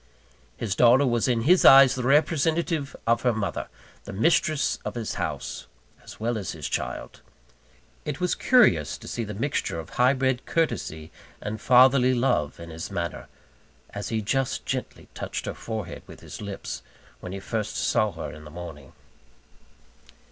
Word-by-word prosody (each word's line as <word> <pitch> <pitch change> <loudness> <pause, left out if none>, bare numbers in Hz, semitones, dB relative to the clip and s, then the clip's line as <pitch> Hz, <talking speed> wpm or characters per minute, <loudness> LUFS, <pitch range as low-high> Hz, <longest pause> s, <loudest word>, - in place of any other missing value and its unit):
His 110 -5 -2
daughter 125 +5 +5
was 120 -2 +1
in 120 -3 +1
his 175 +9 +4
eyes 135 -1 +9
the 130 - -3
representative 155 +2 +1
of 115 +1 +2
her 125 -2 +2
mother: 105 -2 -3 0.4
the - - -7
mistress 155 - +1
of - - -5
his 115 -3 -3
house, - - -4 0.4
as - - -12
well 115 0 -1
as 95 - -5
his - - -5
child. - - -4 0.8
It 150 +1 -4
was 180 -1 +1
curious 90 - +3
to - - -12
see 115 - -3
the 105 -2 -6
mixture 115 - -2
of 80 - -9
high 125 +2 +3
bred 130 -2 -1
courtesy 80 - -2 0.3
and 105 0 -5
fatherly 130 0 +5
love 100 - 0
in 85 0 -9
his 80 +1 -6
manner, 85 0 -4 0.6
as 100 - -5
he 110 -2 -1
just 135 +4 -1
gently - - -4
touched - - -5
her - - -3
forehead 110 -2 -6
with - - -13
his - - -9
lips, 100 -2 -6 0.4
when 90 - -8
he 95 - -5
first 110 +1 -3
saw 110 -3 +1
her 80 - -6
in 75 +1 -11
the 75 - -11
morning. 75 -4 -10
120 Hz, 165 wpm, -25 LUFS, 100-135 Hz, 0.8 s, eyes